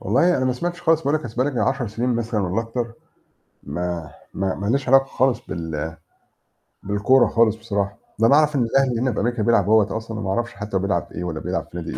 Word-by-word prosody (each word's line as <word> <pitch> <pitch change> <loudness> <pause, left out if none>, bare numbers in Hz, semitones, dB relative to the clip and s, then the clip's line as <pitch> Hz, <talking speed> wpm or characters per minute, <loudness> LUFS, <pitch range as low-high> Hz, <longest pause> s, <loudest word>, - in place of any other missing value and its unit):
والله، 170 - +3
أنا 130 - 0
ما 130 - +2
سمعتش 175 +7 -4
خالص. 165 -1 +3
باقول، 145 +1 +1
لك 155 - -1
أصل 115 -2 -7
بقالي 130 +4 +1
يجي 130 - -2
من - - +2
10 130 -2 0
سنين 120 +3 -1
مثلًا، 115 -2 -1
والّا 95 +3 0
أكتر، 115 +1 -4 0.7
ما 85 0 -4 0.2
ما 95 -1 -1
ما 100 - -5
لياش 130 +4 0
علاقة 135 +1 +6
خالص 130 -1 +1
بال 80 -1 -4 0.9
بالكورة 105 +6 +3
خالص 115 -2 +3
بصراحة. 100 -3 -3 0.2
أنا 115 - +5
باعرف 150 +3 +4
إن 135 - +2
الأهلي 125 0 +1
هنا 130 -1 +1
في - - -2
أمريكا 120 -2 0
بيلعب 115 -3 +4
أهوة 110 -1 +3
أصلًا، 110 -1 -6
وما 95 -2 -3
أعرفش 120 +4 -1
حتى 100 -1 -3
بيلعب 95 -3 0
في - - -15
إيه، 85 - -4
والّا 80 -3 -3
بيلعب 90 +3 -3
في - - -7
نادي 85 - -5
115 Hz, 230 wpm, -22 LUFS, 95-130 Hz, 0.9 s, علاقة